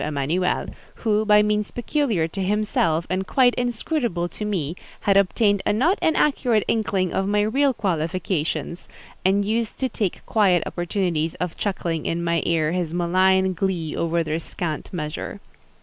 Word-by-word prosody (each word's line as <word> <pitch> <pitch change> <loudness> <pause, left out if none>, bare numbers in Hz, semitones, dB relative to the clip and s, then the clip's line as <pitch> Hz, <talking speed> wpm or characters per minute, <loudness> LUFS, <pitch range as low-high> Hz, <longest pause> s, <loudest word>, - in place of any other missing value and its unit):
Emanuel, 155 +5 0 0.4
who, 215 -1 +3
by 210 0 +6
means 210 0 0
peculiar 240 - 0
to 195 +4 -5
himself, 190 -5 +1
and 185 +1 -2
quite 250 -2 +4
inscrutable 240 - -1
to 210 - -7
me, 175 -7 -2 0.3
had 200 - +2
obtained 200 +1 +3
a - - +1
not 275 - +2
inaccurate 265 -8 +2
inkling 195 -5 0
of 195 - 0
my 205 +1 +2
real 270 +6 +2
qualifications, 170 - -2 0.3
and 200 +2 +2
used 225 +1 -1
to 265 - 0
take 210 -6 -3
quiet 190 -6 +3
opportunities 175 -3 -1
of 180 -2 -4
chuckling 170 -5 -2
in 170 +1 -1
my 170 -1 +1
ear 160 -2 +1
his 175 -2 -2
malign 185 +2 +3
glee 175 -4 -2
over 170 0 0
their 155 +1 -2
scant 160 -1 -5
measure. 160 +4 -5
190 Hz, 150 wpm, -23 LUFS, 170-210 Hz, 0.4 s, by